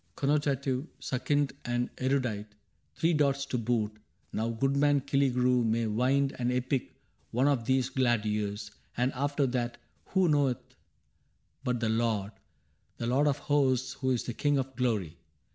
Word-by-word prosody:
" -, -, -42 dB
Connotative, 140 Hz, -1 st, 0 dB
succinct, 135 Hz, +2 st, 0 dB
and 120 Hz, 0 st, -1 dB
erudite; 120 Hz, -6 st, -1 dB, 0.4 s
Three 165 Hz, +1 st, +2 dB
dots 140 Hz, -2 st, +2 dB
to 125 Hz, -2 st, -2 dB
boot. 110 Hz, -2 st, 0 dB, 0.4 s
Now 110 Hz, +2 st, -1 dB
goodman 140 Hz, +4 st, +2 dB
Killigrew 125 Hz, -3 st, +2 dB
May 115 Hz, +1 st, +1 dB
wind 130 Hz, +5 st, +1 dB
an 120 Hz, 0 st, +1 dB
epic 125 Hz, +1 st, -1 dB, 0.3 s
one 130 Hz, +4 st, +2 dB
of 135 Hz, -5 st, +1 dB
these 130 Hz, 0 st, +2 dB
glad 120 Hz, -4 st, +1 dB
years, 105 Hz, 0 st, -2 dB, 0.3 s
And 125 Hz, +2 st, +1 dB
after 140 Hz, +2 st, 0 dB
that 120 Hz, -2 st, -2 dB, 0.3 s
who 190 Hz, -2 st, +2 dB
knoweth 140 Hz, -5 st, +1 dB, 0.9 s
but 125 Hz, -3 st, -1 dB
the 110 Hz, -, +1 dB
Lord 110 Hz, -3 st, 0 dB, 0.3 s
— -, -, -42 dB
The 115 Hz, -, -3 dB
Lord 135 Hz, +5 st, +3 dB
of 145 Hz, -1 st, +2 dB
Hosts 130 Hz, -3 st, +1 dB
who 130 Hz, -1 st, -2 dB
is 125 Hz, -3 st, +1 dB
the 120 Hz, -, -4 dB
King 145 Hz, +3 st, +1 dB
of 135 Hz, 0 st, -3 dB
Glory 105 Hz, -10 st, -1 dB
125 Hz, 155 wpm, -30 LUFS, 115-140 Hz, 0.9 s, Lord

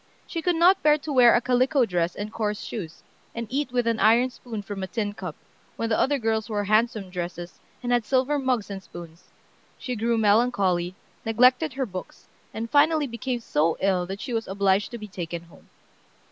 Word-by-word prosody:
she 335 Hz, -, -4 dB
could 355 Hz, +1 st, +1 dB
not 360 Hz, +4 st, +5 dB
bear 300 Hz, 0 st, +5 dB
to 295 Hz, 0 st, -5 dB
wear 245 Hz, -3 st, +7 dB
a -, -, +5 dB
calico 255 Hz, +2 st, +2 dB
dress 175 Hz, -3 st, -1 dB
and 210 Hz, +1 st, -6 dB
coarse 210 Hz, -2 st, -2 dB
shoes, 170 Hz, -8 st, -7 dB, 0.3 s
and 230 Hz, 0 st, -3 dB
eat 280 Hz, -1 st, -1 dB
with 245 Hz, -1 st, 0 dB
an 230 Hz, -1 st, 0 dB
iron 230 Hz, +5 st, +4 dB
spoon 235 Hz, -3 st, -7 dB
from 200 Hz, -1 st, -6 dB
a 190 Hz, -, -3 dB
tin 205 Hz, 0 st, -3 dB
cup, 180 Hz, -6 st, -7 dB, 0.4 s
when 230 Hz, -, -2 dB
the 220 Hz, -, +1 dB
other 285 Hz, +2 st, +2 dB
girls 220 Hz, -3 st, -1 dB
wore 205 Hz, -2 st, -1 dB
handsome 215 Hz, -2 st, +1 dB
dresses, 175 Hz, -1 st, -6 dB, 0.2 s
and 245 Hz, -, -1 dB
had 240 Hz, -1 st, +3 dB
silver 265 Hz, +5 st, +1 dB
mugs 250 Hz, -6 st, -1 dB
and 195 Hz, -1 st, -5 dB
spoons. 170 Hz, -2 st, -12 dB, 0.5 s
She 250 Hz, -2 st, -4 dB
grew 230 Hz, +1 st, 0 dB
melancholy, 200 Hz, -5 st, +2 dB, 0.3 s
neglected 250 Hz, +6 st, +3 dB
her 265 Hz, +1 st, -1 dB
books, 185 Hz, -4 st, -9 dB, 0.3 s
and 225 Hz, +1 st, -4 dB
finally 300 Hz, +4 st, +3 dB
became 240 Hz, 0 st, -4 dB
so 160 Hz, -5 st, +1 dB
ill 185 Hz, -2 st, +1 dB
that 195 Hz, +2 st, -6 dB
she 255 Hz, -, -5 dB
was 225 Hz, -1 st, -2 dB
obliged 195 Hz, +1 st, +1 dB
to 240 Hz, -, -7 dB
be 215 Hz, -2 st, -8 dB
taken 170 Hz, -3 st, -6 dB
home. 170 Hz, -, -19 dB
225 Hz, 200 wpm, -25 LUFS, 195-250 Hz, 0.5 s, wear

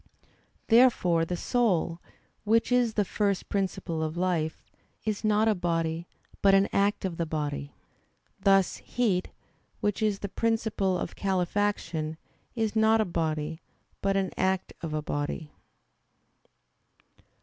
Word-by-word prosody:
Therefore 225 Hz, -9 st, +4 dB
the 175 Hz, +1 st, -3 dB
soul, 175 Hz, -8 st, +1 dB, 0.4 s
which 225 Hz, +3 st, +2 dB
is 245 Hz, -3 st, +3 dB
the 205 Hz, -, +2 dB
first 200 Hz, -1 st, -1 dB
principle 185 Hz, -4 st, -2 dB
of 160 Hz, +1 st, -3 dB
life, 175 Hz, -3 st, -1 dB, 0.4 s
is 215 Hz, -1 st, -2 dB
not 215 Hz, +1 st, +3 dB
a 220 Hz, -, +4 dB
body, 165 Hz, -2 st, -1 dB, 0.3 s
but 195 Hz, -1 st, +6 dB
the 195 Hz, -, -1 dB
act 200 Hz, 0 st, +2 dB
of 175 Hz, -3 st, -4 dB
a 170 Hz, -, +1 dB
body; 145 Hz, -2 st, -3 dB, 0.6 s
thus 195 Hz, -2 st, +3 dB
heat, 205 Hz, -7 st, 0 dB, 0.5 s
which 205 Hz, 0 st, -1 dB
is 210 Hz, -2 st, +2 dB
the 200 Hz, -, -4 dB
principle 220 Hz, -3 st, 0 dB
of -, -, -5 dB
calefaction, 180 Hz, -4 st, -1 dB, 0.4 s
is 225 Hz, -2 st, -1 dB
not 220 Hz, 0 st, +4 dB
a 220 Hz, -, +3 dB
body, 160 Hz, -2 st, -2 dB, 0.4 s
but 195 Hz, 0 st, +1 dB
an 190 Hz, -1 st, 0 dB
act 190 Hz, 0 st, 0 dB
of 160 Hz, -3 st, -3 dB
a 155 Hz, -, -2 dB
body. 145 Hz, +1 st, -3 dB
190 Hz, 130 wpm, -28 LUFS, 165-210 Hz, 0.6 s, but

